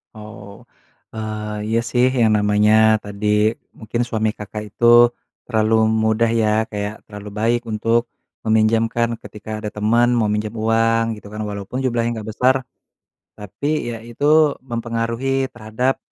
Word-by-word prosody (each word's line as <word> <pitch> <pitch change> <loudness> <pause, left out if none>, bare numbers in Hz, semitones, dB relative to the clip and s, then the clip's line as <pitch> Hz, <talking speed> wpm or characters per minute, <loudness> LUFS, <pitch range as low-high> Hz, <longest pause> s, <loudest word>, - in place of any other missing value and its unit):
Oh. 105 -2 -11 0.5
Eee, 105 -1 -4
iya 115 +1 +1
sih 125 0 +3 0.2
yang 110 -1 +4
namanya 105 +1 +4
tadi 105 +1 -5 0.5
mungkin 115 +2 -3
suami 110 -2 0
Kakak 105 +1 -7
itu 120 - 0 0.6
terlalu 110 -1 +2
mudah 110 +1 +2
ya, 115 -1 +1 0.2
kayak 105 0 -3
terlalu 105 -1 -9
baik 120 +2 +1
untuk 115 +2 +1 0.4
meminjamkan 115 +1 +1
ketika 110 +1 -7
ada 105 - -2
teman 115 +3 +2
mau 110 -3 +2
minjem 105 0 -1
uang 115 0 +1
gitu 105 - -13
kan. 105 - -6
Walaupun 100 +4 -5
jumlahnya 120 -2 0
nggak 110 - -9
besar, 130 +2 +3 0.8
tapi 120 +7 -3
ya 115 - -4
itu 145 +5 +3
mempengaruhi 120 +2 -2
terhadap, 120 +3 -1
110 Hz, 135 wpm, -20 LUFS, 105-115 Hz, 0.8 s, yang